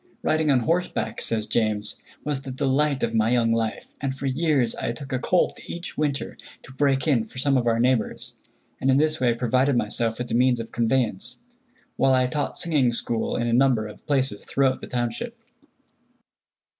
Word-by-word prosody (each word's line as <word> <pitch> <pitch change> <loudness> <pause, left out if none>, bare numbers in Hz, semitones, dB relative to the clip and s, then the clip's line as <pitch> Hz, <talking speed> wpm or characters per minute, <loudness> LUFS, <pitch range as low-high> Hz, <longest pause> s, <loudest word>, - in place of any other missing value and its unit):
"Riding 155 -1 +1
on 130 -3 +4
horseback," 165 -6 -1
says 110 -2 +2
James, 105 -2 0 0.2
"was 145 -2 -2
the 135 - -8
delight 140 +1 0
of 115 - 0
my 110 0 +2
young 120 -2 +2
life, 115 -1 -2
and 135 -1 -2
for 140 - -5
years 135 -3 +1
I 115 - -3
took 135 +3 -8
a 130 - 0
colt 180 +6 +1
each 170 +1 -6
winter 145 -2 -2 0.2
to - - -13
break 135 +1 +1
in 130 -7 +3
for 110 - -13
some 135 +1 +2
of 120 -2 +1
our 115 0 +2
neighbors, 125 -1 0 0.5
and 135 - +1
in 130 - +5
this 155 +1 +1
way 120 -2 +2
provided 130 +3 +2
myself 115 +1 +1
with 125 0 -5
the - - -3
means 125 0 +3
of 115 - -6
conveyance, 120 -1 0 0.6
while 135 -1 +4
I 130 0 +3
taught 140 +3 -2
singing 145 -7 +2
school 115 -1 -2
in 120 - -1
a 120 - 0
number 125 -3 +3
of 105 - -11
places 130 -7 0
throughout 135 -1 +1
the - - -7
township." 120 -2 -3
130 Hz, 190 wpm, -24 LUFS, 115-140 Hz, 0.6 s, in